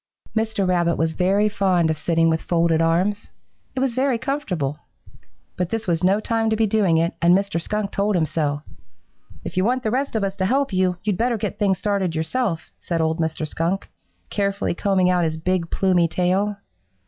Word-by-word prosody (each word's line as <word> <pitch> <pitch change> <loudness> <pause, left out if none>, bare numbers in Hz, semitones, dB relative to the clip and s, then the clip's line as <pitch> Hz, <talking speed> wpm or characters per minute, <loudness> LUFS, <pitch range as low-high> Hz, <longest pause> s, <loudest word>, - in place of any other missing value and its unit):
Mr. 220 -3 0
Rabbit 175 -2 +2
was 160 0 0
very 195 +4 +2
fond 185 -5 +2
of 155 - -3
sitting 165 -1 +2
with 160 0 +1
folded 165 -1 +2
arms. 185 +6 +1 0.5
It 260 - -1
was 265 -3 +1
very 260 0 +1
comfortable. 185 - -2 0.8
But 180 -1 -2
this 225 +1 -3
was 170 -1 0
no 195 +3 +4
time 225 0 0
to 220 - +2
be 220 0 +2
doing 200 -6 +2
it, 165 +1 +1
and 175 +2 +6
Mr. 195 -4 -2
Skunk 210 +2 -2
told 200 +1 0
him 165 -3 +2
so. 150 -1 -2 0.8
"'If - - -7
you 185 - +3
want 250 +4 +1
the 215 - 0
rest 265 +1 -1
of 215 - +1
us 195 0 -2
to 190 -1 +1
help 270 -1 +1
you, 185 -1 +1
you'd 205 -3 0
better 235 0 +1
get - - -4
things 195 -3 +2
started 200 -5 -1
yourself,' 165 +2 -2
said 170 -2 -2
old 160 +1 0
Mr. 160 -1 -1
Skunk, 170 +5 -2 0.4
carefully 200 -1 0
combing 185 0 +2
out 180 -1 +2
his 160 -1 -1
big, 175 +1 -1
plumy 180 -3 +2
tail. 185 +5 0
185 Hz, 195 wpm, -22 LUFS, 165-210 Hz, 0.8 s, and